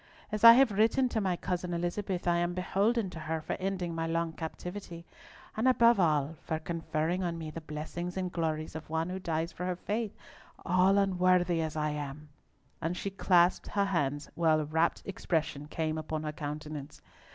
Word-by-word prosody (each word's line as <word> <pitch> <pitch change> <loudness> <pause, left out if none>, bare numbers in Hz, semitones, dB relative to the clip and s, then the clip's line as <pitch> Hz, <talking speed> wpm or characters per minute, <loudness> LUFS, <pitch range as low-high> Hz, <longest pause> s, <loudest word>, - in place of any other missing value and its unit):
As 215 0 -3
I 230 0 +12
have 260 -1 +5
written 225 +5 +3
to 220 - -1
my 185 -3 +1
cousin 175 0 -3
Elizabeth, 175 +2 -2
I 175 0 +3
am 175 0 0
beholden 200 +3 +1
to 165 - -8
her 160 +1 -2
for 155 - -4
ending 185 -3 -2
my 165 0 -2
long 165 0 -1
captivity, 170 +1 -7 0.5
and 220 +4 +1
above 235 -3 +5
all 155 -2 +2
for 160 - -2
conferring 165 +1 -2
on 170 -1 -2
me 160 -2 -6
the 165 - -7
blessings 160 +4 -5
and 185 -1 -2
glories 160 -2 -2
of 160 0 -8
one 160 +2 -1
who 185 +1 -4
dies 165 -2 -2
for 180 - -5
her 180 - -1
faith, 210 +4 -3 0.5
all 185 +3 +4
unworthy 180 -3 +3
as 160 -1 -3
I 150 -1 0
am!" 150 0 -6 0.5
and 170 +3 -2
she 200 - -3
clasped 180 -2 +3
her 200 -1 +1
hands, 145 -6 -1
while 160 -2 +3
a 155 - -1
rapt 160 +3 +1
expression 160 -6 -2
came 155 0 -2
upon 155 0 -4
her 150 - -2
countenance. 150 -1 -6
170 Hz, 185 wpm, -30 LUFS, 155-190 Hz, 0.5 s, I